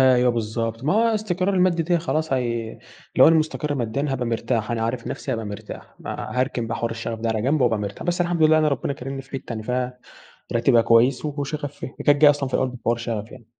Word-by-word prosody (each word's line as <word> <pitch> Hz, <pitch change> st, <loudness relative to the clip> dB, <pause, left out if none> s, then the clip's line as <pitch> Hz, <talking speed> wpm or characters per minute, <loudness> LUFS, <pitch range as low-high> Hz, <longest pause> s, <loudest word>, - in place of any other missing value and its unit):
أيوه 125 Hz, -1 st, +5 dB
بالضبط 115 Hz, +1 st, -3 dB
ما 155 Hz, -, +2 dB
هو 225 Hz, +3 st, +3 dB
الاستقرار 200 Hz, -3 st, 0 dB
المادي 180 Hz, -2 st, +3 dB
دي 170 Hz, +1 st, +1 dB
خلاص 160 Hz, -2 st, -1 dB
هي 115 Hz, -3 st, -2 dB, 0.4 s
لو -, -, +8 dB
أنا 165 Hz, -, +5 dB
مستقر 155 Hz, -1 st, -1 dB
ماديًا 130 Hz, +3 st, -1 dB
هابقى 130 Hz, -3 st, -1 dB
مرتاح، 115 Hz, -1 st, -1 dB
أنا 115 Hz, -1 st, -1 dB
عارف 115 Hz, +1 st, -2 dB
نفسي 135 Hz, -, -4 dB
هابقى 115 Hz, -2 st, -3 dB
مرتاح. 105 Hz, +1 st, -8 dB
ما 125 Hz, -, -4 dB
هاركن 130 Hz, -3 st, -1 dB
بقى 115 Hz, +1 st, -3 dB
حوار 115 Hz, 0 st, -2 dB
الشغف 115 Hz, 0 st, -4 dB
ده 115 Hz, -, -1 dB
على 110 Hz, -1 st, 0 dB
جنب 140 Hz, +5 st, +1 dB
وأبقى 115 Hz, -4 st, +3 dB
مرتا 100 Hz, -1 st, -5 dB
بس 175 Hz, 0 st, -1 dB
الحمد 175 Hz, -2 st, +1 dB
لله 155 Hz, 0 st, +6 dB
أنا 155 Hz, -1 st, +3 dB
ربنا 140 Hz, 0 st, -1 dB
كارمني 135 Hz, 0 st, -6 dB
في 135 Hz, -, -23 dB
حتة 135 Hz, -3 st, -6 dB
أنا 110 Hz, -1 st, -4 dB
فيها 125 Hz, +1 st, -2 dB, 0.6 s
راتبها 120 Hz, 0 st, +4 dB
كويس 120 Hz, +4 st, +3 dB
وشغفي 145 Hz, 0 st, -4 dB
فيها. -, -, -5 dB
هي -, -, -6 dB
كانت 145 Hz, 0 st, +4 dB
جاية 150 Hz, -, +9 dB
أصلًا 140 Hz, -2 st, -3 dB
في -, -, -14 dB
الأول 130 Hz, -1 st, 0 dB
في 125 Hz, -, -9 dB
حوار 115 Hz, 0 st, +2 dB
شغفي 115 Hz, -2 st, -4 dB
يعني. 115 Hz, -, -13 dB
125 Hz, 240 wpm, -23 LUFS, 115-150 Hz, 0.6 s, جاية